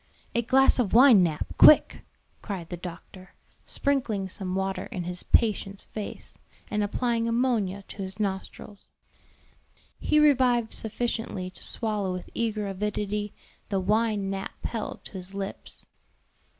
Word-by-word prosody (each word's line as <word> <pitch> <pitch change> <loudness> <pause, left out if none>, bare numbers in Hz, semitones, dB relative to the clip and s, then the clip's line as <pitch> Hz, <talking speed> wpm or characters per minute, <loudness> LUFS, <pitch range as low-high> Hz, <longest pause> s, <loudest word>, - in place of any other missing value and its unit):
"A 235 - +2
glass 265 +3 +4
of 225 -6 +1
wine, 240 -4 +8
Nap, 160 -4 0
quick!" 305 - +7 0.4
cried 185 -6 -6
the 175 - -4
doctor, 180 +2 -10 0.3
sprinkling 235 -9 -1
some 185 -1 -3
water 190 0 -2
in 185 -7 -5
his 180 +1 -4
patient's 200 -3 +1
face, 210 -2 -7 0.4
and 210 0 0
applying 230 +2 0
ammonia 230 -5 0
to - - -10
his 195 0 -5
nostrils. 200 0 -5 1.1
He 305 - +3
revived 255 -6 +3
sufficiently 220 -4 -3
to - - -9
swallow 210 -4 -1
with 180 - -7
eager 215 -3 -1
avidity 210 +1 -3 0.3
the 195 - 0
wine 210 0 +1
Nap 195 0 -6
held 225 -2 -4
to - - -10
his 190 0 -9
lips. 195 0 -6
205 Hz, 135 wpm, -27 LUFS, 190-230 Hz, 1.1 s, wine